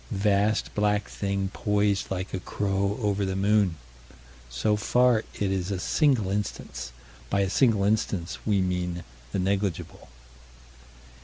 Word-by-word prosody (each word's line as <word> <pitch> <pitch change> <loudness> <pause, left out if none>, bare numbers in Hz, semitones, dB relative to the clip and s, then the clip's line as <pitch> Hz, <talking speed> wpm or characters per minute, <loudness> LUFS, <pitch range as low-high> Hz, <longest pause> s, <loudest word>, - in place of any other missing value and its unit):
Vast 100 +2 +1
black 105 0 +1
thing 100 -1 -2
poised 105 -1 +1
like 95 0 -4
a 95 - -1
crow 100 +2 -1
over 100 -1 +1
the 95 -1 -1
moon. 100 -2 +2 0.7
So 65 - +1
far 125 +2 +3 0.2
it 100 -2 -1
is 95 -1 -1
a 100 - -1
single 120 - +2
instance. 100 -10 -4 0.4
By 100 - +2
a 95 - +1
single 110 -6 +3
instance, 100 -4 0
we 100 -3 +2
mean 90 -1 -2 0.3
the - - -1
negligible. 95 -5 -2
100 Hz, 135 wpm, -27 LUFS, 95-105 Hz, 0.7 s, far